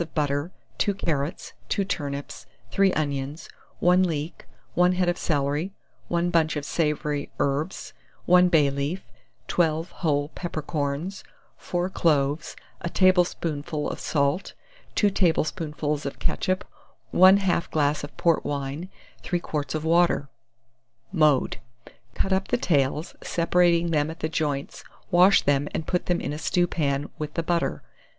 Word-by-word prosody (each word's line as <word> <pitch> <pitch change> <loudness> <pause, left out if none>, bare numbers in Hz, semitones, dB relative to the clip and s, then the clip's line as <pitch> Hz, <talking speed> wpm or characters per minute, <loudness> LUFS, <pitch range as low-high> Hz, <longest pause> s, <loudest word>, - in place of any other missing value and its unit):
of 170 - -6
butter, 145 +2 0 0.3
2 205 - +1
carrots, 155 -4 -2 0.2
2 200 - +1
turnips, 145 -6 -4 0.2
3 195 -1 +4
onions, 145 0 -2 0.3
1 180 +1 +5
leek, 160 -3 -2 0.3
1 180 +1 +4
head 180 0 +1
of 175 - +2
celery, 150 +3 -1 0.3
1 175 0 0
bunch 160 -2 +2
of 145 -1 -3
savoury 150 -2 -1
herbs, 145 +6 -2 0.3
1 180 0 +6
bay 150 -5 +4
leaf, 140 +7 -3 0.4
12 165 0 +1
whole 145 -3 0
peppercorns, 155 +1 -3 0.3
4 175 0 -2
cloves, 150 -4 +1 0.3
a 170 - -2
tablespoonful 170 -5 +1
of - - -5
salt, 145 +5 0 0.4
2 205 -2 +3
tablespoonfuls 155 -4 0
of 140 - -6
ketchup, 185 0 -1 0.5
1/2 185 -1 +5
glass 145 -1 +1
of 145 - -9
port 165 -2 +2
wine, 145 +5 -4 0.3
3 175 - -1
quarts 150 -3 -3
of 155 0 -3
water. 170 -4 +3 0.8
Mode. 155 -7 +3 0.6
Cut 190 - 0
up 190 +1 0
the 245 - +1
tails, 150 - 0
separating 170 0 +2
them 150 -1 +1
at 160 - -8
the 155 - -1
joints; 145 -3 -2 0.3
wash 185 +2 +6
them, 145 0 +2
and 160 - -2
put 180 +1 -1
them 175 -1 +1
in - - -3
a 150 - -5
stewpan, 155 -5 0
with 150 -1 -5
the 165 - 0
butter. 170 - -1
160 Hz, 140 wpm, -25 LUFS, 145-180 Hz, 0.8 s, 1